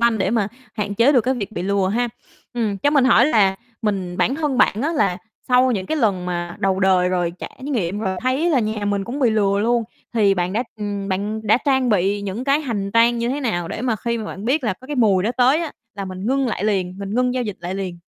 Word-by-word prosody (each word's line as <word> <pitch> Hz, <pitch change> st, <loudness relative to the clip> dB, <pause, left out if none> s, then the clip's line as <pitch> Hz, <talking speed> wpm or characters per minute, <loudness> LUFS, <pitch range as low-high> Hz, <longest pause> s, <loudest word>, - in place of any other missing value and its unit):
quanh 235 Hz, -2 st, +3 dB
để 190 Hz, -, +1 dB
mà 215 Hz, -3 st, +1 dB, 0.3 s
hạn 205 Hz, -2 st, -3 dB
chế 240 Hz, +7 st, +4 dB
được 250 Hz, -, +5 dB
cái 260 Hz, +3 st, 0 dB
việc 215 Hz, -3 st, -5 dB
bị 175 Hz, -, -4 dB
lừa 195 Hz, -1 st, +1 dB
ha. 240 Hz, +4 st, 0 dB, 0.5 s
Ừm, 215 Hz, -4 st, -1 dB
cho 290 Hz, -, +2 dB
mình 280 Hz, -4 st, +4 dB
hỏi 245 Hz, 0 st, +5 dB
là 200 Hz, -8 st, +3 dB, 0.3 s
mình 190 Hz, -4 st, -2 dB
bản 265 Hz, -, +1 dB
thân 290 Hz, -4 st, -1 dB
bạn 215 Hz, +5 st, +3 dB
á 320 Hz, +3 st, 0 dB
là 195 Hz, -, +1 dB, 0.3 s
sau 250 Hz, +1 st, +4 dB
những 190 Hz, -3 st, -2 dB
cái 315 Hz, -, -1 dB
lần 195 Hz, -8 st, 0 dB
mà 175 Hz, -1 st, -3 dB
đầu 195 Hz, 0 st, +1 dB
đời 185 Hz, -1 st, +3 dB
rồi 175 Hz, -2 st, 0 dB
trải -, -, -9 dB
nghiệm 210 Hz, -9 st, -2 dB
rồi, 190 Hz, -3 st, -2 dB
thấy 265 Hz, +7 st, +1 dB
là 270 Hz, -6 st, +3 dB
nhà 215 Hz, -1 st, -2 dB
mình 200 Hz, -1 st, 0 dB
cũng 260 Hz, +7 st, -5 dB
bị 245 Hz, -5 st, +3 dB
lừa 200 Hz, -2 st, +2 dB
luôn 235 Hz, +1 st, +1 dB, 0.3 s
thì 205 Hz, -4 st, +4 dB
bạn 180 Hz, 0 st, -1 dB
đã 230 Hz, +4 st, 0 dB
ừm, 205 Hz, -1 st, -4 dB
bạn 205 Hz, +3 st, -2 dB
đã 220 Hz, +4 st, +5 dB
trang 265 Hz, -3 st, +2 dB
bị 200 Hz, 0 st, +1 dB
những 205 Hz, +5 st, -4 dB
cái 280 Hz, +2 st, +2 dB
hành 205 Hz, -8 st, -3 dB
trang 235 Hz, +1 st, +4 dB
như 235 Hz, -, -1 dB
thế 280 Hz, +3 st, -2 dB
nào 175 Hz, -9 st, -1 dB
để -, -, -5 dB
mà 235 Hz, -4 st, 0 dB
khi 235 Hz, +2 st, -2 dB
mà 220 Hz, -, -5 dB
bạn 200 Hz, 0 st, -7 dB
biết 270 Hz, +3 st, +1 dB
là 215 Hz, -, +1 dB
có 260 Hz, -, -13 dB
cái 295 Hz, -1 st, -4 dB
mùi 200 Hz, -6 st, +3 dB
đó 220 Hz, -, 0 dB
tới 260 Hz, +6 st, +4 dB
á, 325 Hz, -4 st, -4 dB, 0.2 s
là 200 Hz, -1 st, -5 dB
mình 185 Hz, +2 st, -6 dB
ngưng 270 Hz, +1 st, +1 dB
lại 210 Hz, -4 st, -2 dB
liền, 190 Hz, -3 st, -1 dB
mình 200 Hz, +1 st, -5 dB
ngưng 250 Hz, +1 st, +1 dB
giao 255 Hz, -, 0 dB
dịch 210 Hz, -5 st, -4 dB
lại 175 Hz, +2 st, -4 dB
liền? 185 Hz, -3 st, -4 dB
215 Hz, 265 wpm, -21 LUFS, 195-250 Hz, 0.5 s, được